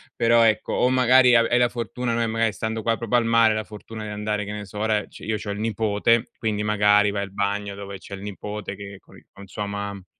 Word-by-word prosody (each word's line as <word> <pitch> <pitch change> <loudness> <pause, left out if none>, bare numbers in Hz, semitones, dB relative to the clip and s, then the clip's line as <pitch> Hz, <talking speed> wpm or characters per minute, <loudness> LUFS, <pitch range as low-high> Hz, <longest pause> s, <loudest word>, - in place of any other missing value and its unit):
Però, 115 0 +4
ecco, 110 -1 +1
o 125 - +2
magari 130 0 +5
ave 115 0 +5
hai 120 - +3
la 125 0 +4
fortuna, 120 0 -3
no, 115 - 0
e 115 - +1
magari 115 -1 0
stando 110 +2 -4
qua, 115 +1 +1
proprio 115 +1 -2
al 120 -1 +3
mare, 115 -1 +4
la 110 - -2
fortuna 110 +1 -9
di 105 - -6
andare, 105 0 -2
che 100 - -6
ne 105 0 -6
so, 100 +2 -11
ora 105 0 0
ci - - -14
io 110 0 -1
c'ho 105 - -7
il 100 0 -4
nipote, 110 +1 +1
quindi 110 -2 -2
magari 105 0 +3
vai 100 0 -2
al 100 - -8
bagno 100 +1 -2
dove 100 0 -8
c'è 100 - -12
il 95 - -7
nipote 105 0 -6
che 100 0 -10
con - - -19
i - - -19
con 100 0 -12
sua 105 +2 -5
mam 100 -1 -5
105 Hz, 260 wpm, -23 LUFS, 100-115 Hz, -, magari